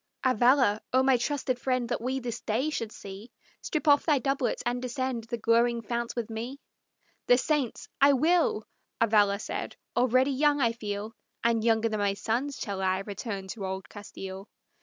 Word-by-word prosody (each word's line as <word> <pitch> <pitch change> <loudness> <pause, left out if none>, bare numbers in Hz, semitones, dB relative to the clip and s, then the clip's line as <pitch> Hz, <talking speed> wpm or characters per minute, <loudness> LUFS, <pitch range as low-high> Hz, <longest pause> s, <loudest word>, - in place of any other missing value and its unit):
"Avalla, 250 -3 +4
O 260 +1 +5
my 265 -1 +5
trusty 260 +1 0
friend 255 -1 -1
that - - -1
we 260 +2 -1
this 240 -3 -5
day 250 +8 -1
should 230 -7 -3
see! 200 +4 -10 0.3
Strip 310 -1 -3
off 290 -1 +6
thy 300 -3 +3
doublet 275 -1 -1
and 245 +1 -1
descend 255 -2 -3
the 235 +1 -4
glowing 230 +1 +2
fount 235 +2 -3
with 235 -3 -2
me!" 235 +5 -6 0.7
"The 245 - +6
saints! 280 -2 -1
I 280 +1 +7
will," 315 -5 +2 0.4
Avalla 210 -3 +4
said. - - -5 0.2
"Already 255 +2 +3
young 290 +2 +2
I 235 -4 +3
feel, 215 -1 -5 0.3
And 230 -1 +2
younger 225 -1 +3
than 215 -1 -2
my 200 -1 +1
sons 245 +7 -2
shall 195 -2 -4
I 190 0 +1
return 200 -1 -5
to 205 0 -6
old 190 0 -4
Castile." 195 -1 -9
235 Hz, 175 wpm, -28 LUFS, 215-260 Hz, 0.7 s, I